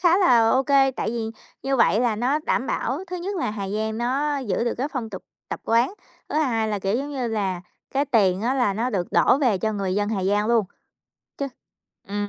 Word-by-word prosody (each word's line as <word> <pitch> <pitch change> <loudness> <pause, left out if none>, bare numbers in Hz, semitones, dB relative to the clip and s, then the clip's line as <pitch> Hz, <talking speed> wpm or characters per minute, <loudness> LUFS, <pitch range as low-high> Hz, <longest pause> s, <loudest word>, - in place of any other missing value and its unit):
khá 350 +1 +4
là 235 - +5
ô 265 - +3
kê, 270 0 +4
tại 245 - -3
vì 225 -1 -3 0.3
như 270 0 0
vậy 230 -2 +4
là 235 -3 +1
nó 255 +7 +1
đảm 270 -4 -1
bảo 275 - -1
thứ 360 - -5
nhất 380 +3 -4
là 330 - -1
Hà 200 -2 -4
Giang 220 +2 -2
nó 280 +4 0
giữ 235 -4 -1
được 235 - 0
cái 275 - -1
phong 250 -7 -4
tục 190 - -7 0.3
tập - - -5
quán, 235 - +2 0.4
thứ - - 0
hai 230 -7 +1
là, 210 -1 -1
kiểu, 195 +3 0
giống 280 +3 -3
như 260 -4 -2
là, 195 -5 -1 0.3
cái 275 +1 +1
tiền 205 -7 +2
á 250 +3 +1
là 245 -7 +1
nó 235 +5 -1
được 180 -6 -2
đổ 265 - +4
về 245 -9 +2
cho 220 +3 -1
người 195 -3 -2
dân 205 +1 0
Hà 200 -4 -1
Giang 205 +2 +2
luôn, 230 -2 +3 0.7
chứ 280 -1 -2 0.6
ừm. 205 0 -2
235 Hz, 235 wpm, -24 LUFS, 210-270 Hz, 0.7 s, là